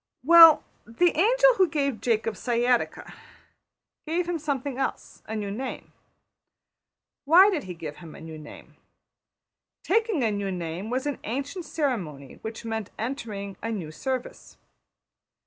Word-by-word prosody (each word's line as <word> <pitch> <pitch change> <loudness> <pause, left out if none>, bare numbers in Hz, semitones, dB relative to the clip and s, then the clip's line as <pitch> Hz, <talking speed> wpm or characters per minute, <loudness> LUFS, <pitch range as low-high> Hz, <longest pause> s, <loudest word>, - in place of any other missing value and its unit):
Well, 330 +1 +9 0.2
the 340 +10 +1
angel - - +5
who 375 - +5
gave 280 -7 -2
Jacob 225 -2 0
sciatica 240 +3 0 0.9
gave 340 +2 -1
him 345 -2 -2
something 280 -3 -3
else: 270 - -4
a 220 - -4
new 205 -2 -3
name. 255 +6 -6 1.3
Why 365 +7 +7
did 330 - -2
he 180 -1 -7
give 155 -3 -7
him 165 -3 -12
a - - -11
new 160 -1 -9
name? 150 - -13 1.1
Taking 435 - +1
a 220 - +1
new 200 -1 -2
name 175 +3 -5
was 255 +3 -2
an 290 -2 -3
ancient 280 - -4
ceremony 190 - -3
which 220 +1 -7
meant 220 -3 -4
entering 215 -5 -5
a 225 - -3
new 175 -8 -5
service. 255 - -5
245 Hz, 140 wpm, -26 LUFS, 200-305 Hz, 1.3 s, Well